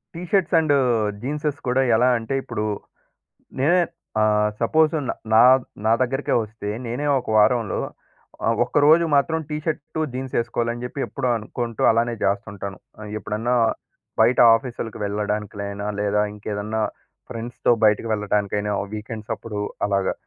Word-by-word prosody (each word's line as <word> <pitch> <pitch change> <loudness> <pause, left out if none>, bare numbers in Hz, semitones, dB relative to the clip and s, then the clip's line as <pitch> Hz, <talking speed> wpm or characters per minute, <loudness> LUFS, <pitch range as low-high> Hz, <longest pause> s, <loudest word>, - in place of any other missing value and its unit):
T 170 - -6
shirts 190 -3 +2
and 155 -3 +3 0.5
జీన్సెస్ 145 +2 -2
కూడా 130 +2 +2
ఎలా 120 +3 +4
అంటే 115 +4 -4
ఇప్పుడు, 105 - -4 1.0
నేనే 170 +7 +4 0.4
ఆహ్, 105 0 +3
సపోజ్ 155 +7 +3 0.4
నా 110 - +8 0.4
నా 110 - +4
దగ్గరికే 135 +3 -1
వస్తే 105 -1 -7 0.2
నేనే 125 +6 -3
ఒక 120 - -8
వారంలో 110 0 +3 0.6
ఆహ్, 115 0 +2
ఒక్కరోజు 150 +6 +4
మాత్రం 160 +3 +2
టీ 150 - -1
షర్ట్ 160 -1 -4
జీన్స్ 130 0 -5
ఏసుకోవాలని 120 0 -2
చెప్పి 130 +3 -5
ఎప్పుడో 130 -3 -3
అనుకుంటూ 115 +1 -5
అలానే 115 +1 +1
జేస్తుంటాను. 100 -1 -2 0.4
ఎప్పుడన్నా 110 +4 -1 0.6
బయట 120 +3 +4 0.2
ఆఫీసులకి 115 -2 -4
వెళ్ళడానికైనా, 100 0 -3
లేదా 105 0 +1
ఇంకేదన్నా 105 +1 -3 0.5
ఫ్రెండ్స్‌తో 120 0 -1
బయటికి 105 +2 +3
వెళ్ళటానికైనా 105 0 -1 0.2
వీకెండ్స్ 110 0 -7
అప్పుడు 105 -2 -7 0.3
అలాగా. 100 -2 +1
115 Hz, 125 wpm, -23 LUFS, 105-130 Hz, 1.0 s, నా